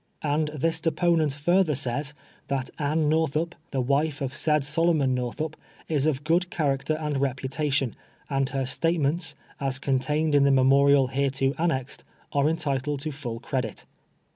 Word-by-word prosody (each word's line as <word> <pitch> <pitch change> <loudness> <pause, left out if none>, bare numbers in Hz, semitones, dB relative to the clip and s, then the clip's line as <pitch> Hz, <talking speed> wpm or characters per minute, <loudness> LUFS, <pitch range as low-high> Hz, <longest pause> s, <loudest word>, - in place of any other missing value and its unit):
And 150 +1 +1
this 160 +2 -1
deponent 165 -2 +2
further 175 +1 +2
sajs, 140 +2 -2 0.3
that 135 -2 -2
Amie 155 +2 +1
Nortliup, 160 +2 +1 0.2
the 135 - -1
wife 140 +3 +1
of 135 -1 -3
said 150 -2 +1
Solomon 155 -3 +2
Northup, 125 +5 -3 0.3
is 150 -2 +1
of 145 -2 0
g<3od 170 +4 +1
character 145 -2 0
and 150 -3 -2
reputation, 135 0 -1 0.3
and 135 -2 0
her 135 -2 -1
statements, 165 +3 0 0.2
as 135 -1 0
contained 145 +3 0
in 145 -1 +5
the 140 - +4
memorial 135 0 +5
hereto 135 0 0
amiexed, 140 -6 -1 0.3
are 145 +1 +3
entitled 145 -3 -1
to 155 +1 -3
full 125 -5 -6
credit. 125 -7 -3
145 Hz, 145 wpm, -26 LUFS, 135-155 Hz, 0.3 s, in